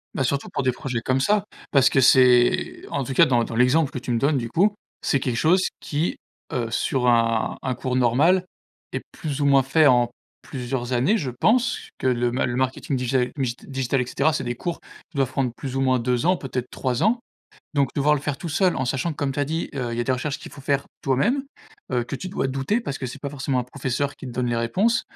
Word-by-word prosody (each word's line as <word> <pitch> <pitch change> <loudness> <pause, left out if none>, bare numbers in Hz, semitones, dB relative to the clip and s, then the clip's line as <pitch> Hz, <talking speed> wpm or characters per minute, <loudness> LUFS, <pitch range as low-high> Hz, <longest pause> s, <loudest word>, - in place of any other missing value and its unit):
Bah, 135 - +1
surtout 140 +3 -1
pour - - -1
des 130 - +3
projets 125 -2 -3
comme 130 +3 +1
ça. 205 +6 +2 0.3
Parce 135 -3 +5
que 135 - +3
c'est 125 -1 +4
en 140 - -1
tout 135 - -4
cas - - +6
dans 120 -2 +2
dans 115 - -6
l'exemple 130 +5 +3
que 130 - -4
tu 125 - -5
me 115 - +1
donnes 140 +2 +2
du 120 -2 -3
coup, 205 - +2 0.3
c'est 135 - +1
quelque 125 -3 -1
chose 180 +7 +3
qui, 155 +3 -2 0.3
heu, 120 -3 -2
sur 125 +2 0
un 115 -2 +2
un 130 -1 -2
cours 125 +1 -3
normal, 145 +10 +3 0.5
est - - -3
plus 150 -4 -4
ou - - +2
moins 140 -1 +5
fait 145 +4 +4
en 120 -2 +4 0.3
plusieurs 125 -2 -4
années, 135 - +3
je 140 -8 -3
pense 225 - +2 0.2
que - - -1
le 120 -1 +1
ma 130 - +1
le 120 - -2
marketing 130 +1 -1
digé 125 0 0
migit 125 -3 -1
digital 135 -1 -1
et 125 - -2
cetera, 145 +5 +1
c'est 135 - -2
des 120 0 -3
cours 170 +6 -4
qui 170 - -19
doivent 135 -2 +1
prendre 130 -3 0
plus 135 -2 -5
ou 135 - +1
moins 130 -1 +3
2 125 +3 0
ans, 180 +2 +4
peut-être 130 -5 -4
3 130 -2 -1
ans. 235 +3 +3 0.6
Donc 140 -2 +3
devoir 150 +1 +3
le 145 - -2
faire 145 -1 -3
tout 170 - -5
seul, 180 +4 +2
en 130 - -1
sachant 135 +6 -1
comme 145 -2 -2
tu 145 - -2
as - - +2
dit, 160 +4 -3
heu, 125 -3 -2
il - - -3
y - - +2
a - - -1
des 130 - +1
recherches 140 +3 -2
qu'il - - -11
faut 145 - -11
faire 140 0 0 0.2
toi-même, 205 - +1 0.5
heu, 125 -2 0
que - - -6
tu 185 - -6
dois 180 - -1
douter 135 - -1
parce 140 - -4
que 130 - -4
c'est 130 +3 -8
pas 140 - -3
forcément 135 -2 -2
un 125 - -1
professeur 135 +2 -2
qui - - -9
te 125 - -6
donne 125 +1 -1
les 120 -1 0
réponses. 190 - +1
135 Hz, 250 wpm, -23 LUFS, 125-145 Hz, 0.6 s, cas